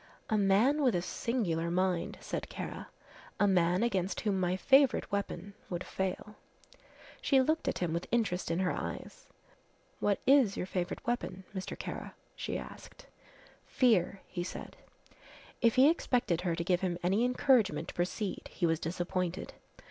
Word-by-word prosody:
"A - - +4
man 210 +9 +3
with 250 -8 +3
a 175 - +1
singular 175 -8 -1
mind," 180 0 0
said - - -4
Kara; - - -6 0.5
"a 205 - +5
man 180 0 +3
against 190 -5 0
whom 200 -3 0
my 180 0 +1
favourite 270 +5 +4
weapon 200 -1 -3 0.2
would 175 0 -3
fail." 190 +2 -4 0.8
She 280 - +4
looked 315 +5 +1
at - - 0
him 175 -3 -1
with 170 +1 -3
interest 215 -6 0
in 165 - 0
her 180 - +1
eyes. - - -6 0.7
"What 205 -1 +1
is 265 -7 +5
your - - -2
favourite 180 -1 -3
weapon, 190 -6 -2
Mr. 190 -1 -5
Kara?" - - -6 0.2
she - - -3
asked. - - -10 0.6
"Fear," 200 -7 +2
he 175 - -4
said. 180 - -7 0.9
If 230 -2 +4
he 260 +2 +7
expected 245 - +1
her 175 -2 0
to 170 - -2
give 180 0 +1
him 180 -2 -1
any 195 +6 +2
encouragement 250 -3 +2
to - - -7
proceed 185 +3 -3
he 175 - -1
was 165 -1 +2
disappointed. 175 +1 -3
190 Hz, 155 wpm, -32 LUFS, 180-235 Hz, 0.9 s, he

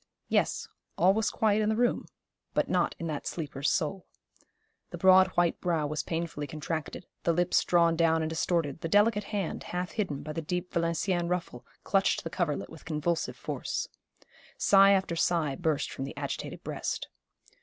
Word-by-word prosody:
Yes, - - +1 0.3
all 185 +3 +5
was 220 +1 +1
quiet 215 -1 +2
in 215 - +1
the 220 - +1
room, 240 +1 +1 0.5
but - - +2
not - - +1
in 170 - -5
that 155 -3 -4
sleeper's 145 -4 -2
soul. 180 +4 -1 0.8
The - - -7
broad 190 0 +7
white 175 -1 +2
brow 165 -4 0
was 150 +1 -2
painfully 165 -3 -3
contracted, 155 +3 -5 0.2
the 170 - +2
lips 175 +2 +2
drawn 170 -1 +3
down 165 -1 +3
and 155 - -1
distorted, 160 -2 -1
the - - -2
delicate 210 +2 +3
hand, 200 -5 -3
half 180 0 -3
hidden 190 -11 -3
by 155 - -5
the 165 - -3
deep 180 +3 -4
Valenciennes 170 +1 0
ruffle, 175 -9 -3 0.2
clutched 195 -2 +2
the 165 - -5
coverlet 170 -6 -2
with 160 - -12
convulsive 165 +1 -1
force. - - -3 0.7
Sigh 195 0 +6
after 190 -3 +1
sigh 165 -4 +1
burst 155 -2 -1
from 135 - -4
the - - -8
agitated - - -5
breast. - - -3
170 Hz, 170 wpm, -29 LUFS, 155-185 Hz, 0.8 s, broad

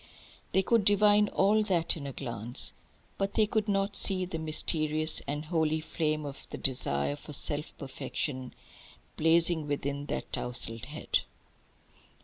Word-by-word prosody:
They 190 - +3
could 230 +1 +2
divine 205 +1 +5
all 205 +3 +3
that 175 -5 +2
in 145 -4 -6
a - - -4
glance. 120 -1 0 0.5
But 195 0 -1
they 215 - +4
could 215 0 -1
not 195 0 0
see 185 -2 +1
the 170 -3 -5
mysterious 155 0 +1
and 150 +2 -3
holy 160 -1 0
flame 155 -1 -2
of 140 -1 -9
the - - -6
desire 70 - +1
for 150 - -11
self 145 +2 -1
perfection 130 -1 -4 0.6
blazing 165 -1 +3
within 145 0 -3
that - - -5
tousled 115 -2 0
head. 150 +3 -1
155 Hz, 140 wpm, -29 LUFS, 140-190 Hz, 0.6 s, divine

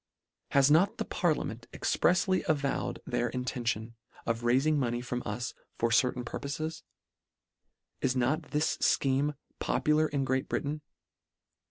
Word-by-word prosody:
Has 140 +1 +4
not 175 +6 +4
the - - -2
parliament - - -1
exprefsly 185 +1 +2
avowed 145 -3 0
their 120 - 0
intention 120 -2 -2 0.3
of 115 0 -1
railing 135 +6 +3
money 120 -2 0
from 125 0 -3
us 115 +3 -3 0.2
for 115 0 +1
certain 125 0 +2
purpofes? 155 +6 -4 1.2
Is 125 - +1
not 140 +6 0
this 150 +1 +1
fcheme 140 +2 +2 0.2
popu 150 - +2
lar 155 0 +3
in 140 -3 -1
Great 130 0 0
Britain 150 +2 -2
135 Hz, 130 wpm, -30 LUFS, 120-150 Hz, 1.2 s, Has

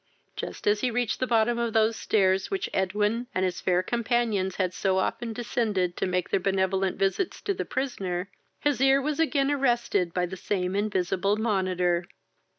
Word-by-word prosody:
Just - - -6
as 205 0 +3
he 255 - +1
reached 240 -1 -1
the 255 - 0
bottom 235 0 +2
of 235 -2 -1
those 220 0 +3
stairs 190 -3 +1
which 390 -2 -2
Edwin 210 +5 0
and 185 - +2
his 180 -1 -2
fair 180 0 +2
companions 230 -5 0
had 185 -2 -1
so 190 0 0
often 230 +4 -1
descended 215 -6 -1
to - - 0
make 180 -1 -1
their - - +3
benevolent 190 0 0
visits 195 - 0
to 400 - -1
the - - -4
prisoner, 190 -9 -3 0.3
his 290 -3 0
ear 270 0 +5
was 295 +2 -2
again 290 -3 +2
arrested 240 -10 +1
by 180 +1 0
the 185 +2 -6
same 185 0 -2
invisible 200 -1 0
monitor. 185 -5 +1
205 Hz, 175 wpm, -27 LUFS, 185-240 Hz, 0.3 s, ear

